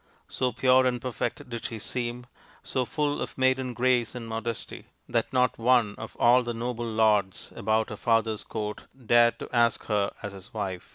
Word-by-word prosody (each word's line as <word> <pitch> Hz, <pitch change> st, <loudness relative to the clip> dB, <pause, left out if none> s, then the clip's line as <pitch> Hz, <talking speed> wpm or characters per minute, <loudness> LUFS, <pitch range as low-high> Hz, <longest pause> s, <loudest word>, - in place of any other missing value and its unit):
So 125 Hz, -1 st, -1 dB
pure 130 Hz, +2 st, +4 dB
and 125 Hz, -1 st, 0 dB
perfect 120 Hz, -1 st, -4 dB
did 120 Hz, -2 st, -6 dB
she 115 Hz, -, -4 dB
seem, 120 Hz, +2 st, -4 dB, 0.4 s
so 130 Hz, -1 st, -1 dB
full 150 Hz, 0 st, -1 dB
of -, -, -5 dB
maiden 130 Hz, -1 st, +1 dB
grace 125 Hz, -2 st, +1 dB
and 120 Hz, -2 st, -6 dB
modesty, 115 Hz, 0 st, -5 dB, 0.2 s
that 115 Hz, -1 st, -1 dB
not 125 Hz, -2 st, +2 dB
one 120 Hz, -3 st, +3 dB
of -, -, -8 dB
all 125 Hz, +2 st, +6 dB
the 120 Hz, -1 st, -4 dB
noble 120 Hz, 0 st, -3 dB
lords 105 Hz, -3 st, +1 dB
about 110 Hz, 0 st, +1 dB
her 105 Hz, -, -5 dB
father's 115 Hz, -1 st, +1 dB
court 105 Hz, -1 st, -5 dB, 0.2 s
dared 120 Hz, +1 st, +5 dB
to -, -, -7 dB
ask 120 Hz, -1 st, +3 dB
her 105 Hz, -2 st, 0 dB
as 105 Hz, -2 st, -5 dB
his 95 Hz, +2 st, -11 dB
wife. 95 Hz, -4 st, -4 dB
120 Hz, 180 wpm, -27 LUFS, 110-125 Hz, 0.4 s, all